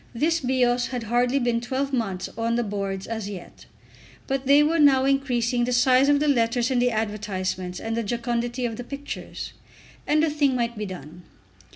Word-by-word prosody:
This 325 +7 +1
Bios 245 -2 +1
had 250 -2 -4
hardly 245 +4 +1
been 240 -3 +1
twelve 270 +3 -2
months 195 -7 -2
on 230 +1 0
the 240 - +1
boards 195 -2 -3
as 220 -3 -4
yet! 190 -4 -10 0.6
But 270 -1 -2
they 285 +2 +6
were 325 +2 +1
now 270 -3 +5
increasing 250 -3 +1
the 250 - -1
size 255 +2 +4
of 290 0 +4
the 300 - +1
letters 240 -1 +2
in 250 - +2
the 245 0 +3
advertisements 200 -5 -3
and 225 0 -3
the 230 - 0
jocundity 240 +2 -2
of 225 -2 -3
the 245 - -5
pictures, 280 +3 -7 0.5
and 305 +1 +3
the 320 - +2
thing 285 -3 +2
might 235 -1 -1
be 210 -1 -4
done. 175 -2 -9
240 Hz, 190 wpm, -24 LUFS, 225-270 Hz, 0.6 s, they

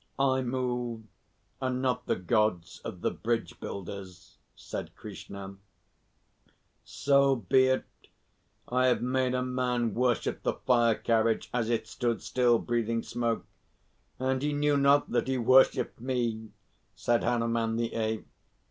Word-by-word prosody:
I 135 -1 +2
move, 125 -2 -2 0.6
and 130 -1 -1
not 130 -1 -1
the - - +2
Gods 95 -2 0
of - - -7
the - - +1
bridge 115 0 -2
builders," 95 -2 -8 0.2
said - - -7
Krishna. 100 -1 -9 1.3
"So 140 -1 +3
be 130 +3 +3
it. 130 0 +1 0.8
I 130 +1 +2
have 125 - +2
made 130 0 +1
a 125 - 0
man 125 -3 0
worship 125 0 0
the - - 0
fire 120 -3 +3
carriage 115 0 +1
as 120 -2 0
it 115 -2 0
stood 115 +1 -2
still 120 -2 +3
breathing 115 -1 -1
smoke, 115 -1 -2 0.7
and 130 0 0
he 145 +1 0
knew 145 0 +2
not 140 +1 +4
that - - +1
he 130 0 0
worshipped 130 +2 +4
me," 120 -4 -2 0.5
said 120 -1 +1
Hanuman 115 -1 0
the 115 0 -2
Ape. 110 -1 -2
120 Hz, 135 wpm, -29 LUFS, 115-130 Hz, 1.3 s, not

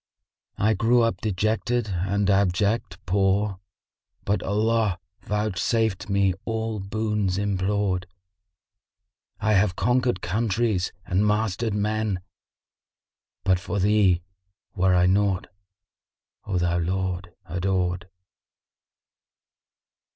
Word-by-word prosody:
I 110 +2 +3
grew 115 +4 +3
up 115 - 0
dejected 110 +3 0
and 95 +2 0
abject; 100 0 +1
poor, 95 +1 +1 0.3
* - - -44
But 100 +2 +1
Allah 110 -1 +1 0.2
vouchsafed 105 +1 -1
me 100 -1 +2
all 110 -1 -2
boons 105 -1 -1
implored: 100 -2 0 1.3
I 110 - +2
have 100 -2 +3
conquered 125 0 +1
countries 105 -1 0
and 95 +3 +1
mastered 105 0 0
men 105 -2 0 0.6
* - - -68
But 95 -2 +3
for 95 +1 -4
Thee 100 -3 +3 0.5
were 95 -1 +3
I 90 0 +4
naught, 95 0 +1 1.0
O 95 - -1
thou 85 0 +1
Lord 90 0 -2
adored!" 90 0 -1
100 Hz, 100 wpm, -25 LUFS, 95-110 Hz, 1.3 s, I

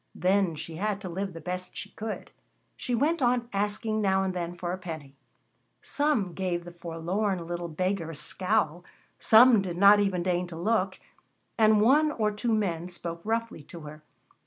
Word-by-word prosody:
Then 185 -2 +2
she 160 +1 -7
had 205 +1 -1
to 185 - -5
live 190 +2 -4
the 165 - -8
best 180 +3 -5
she - - -6
could. 215 0 -6 0.4
She 245 - -2
went 295 +6 +1
on 240 -1 +2
asking 210 +2 -1
now 190 -1 +2
and 190 -1 -1
then 175 -1 -4
for 175 0 -4
a - - -3
penny. 155 -6 -8 0.7
Some 285 - 0
gave 175 -2 -2
the 175 - -8
forlorn 175 +2 -2
little 175 0 -4
beggar 185 +1 -2
a 165 - -7
scowl, 180 0 0 0.4
some 225 -1 +7
did 180 -3 -4
not 200 +2 +7
even 190 -4 +1
deign 180 0 0
to 170 - -9
look, 190 +1 0 0.6
and 215 -1 +5
one 295 +7 +4
or 215 -2 0
two 220 +3 -2
men 180 -6 -1
spoke 170 -1 -6
roughly 225 -5 -2
to 170 - -10
her. 150 0 -10
190 Hz, 180 wpm, -28 LUFS, 175-215 Hz, 0.7 s, some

